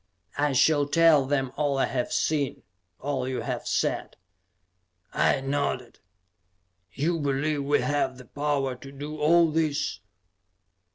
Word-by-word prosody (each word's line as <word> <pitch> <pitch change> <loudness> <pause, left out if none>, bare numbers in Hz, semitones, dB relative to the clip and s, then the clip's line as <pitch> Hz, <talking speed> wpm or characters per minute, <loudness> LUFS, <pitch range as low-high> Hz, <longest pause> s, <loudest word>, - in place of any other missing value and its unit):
"I 145 -1 +2
shall 145 +2 +3
tell 155 -2 +4
them 135 -2 0
all 145 -2 +1
I 135 - +3
have 125 -2 -2
seen; 145 -4 -1 0.4
all 140 -2 -2
you 130 -1 -2
have - - -4
said," - - -1 1.0
I - - +2
nodded. 135 -3 -2 0.9
"You 165 - -1
believe 145 0 -1
we 145 +1 +2
have 130 0 0
the 125 - -12
power 140 0 -1
to 135 +2 -11
do 145 +2 -7
all 165 +2 +4
this?" 150 - -1
145 Hz, 130 wpm, -26 LUFS, 135-150 Hz, 1.0 s, tell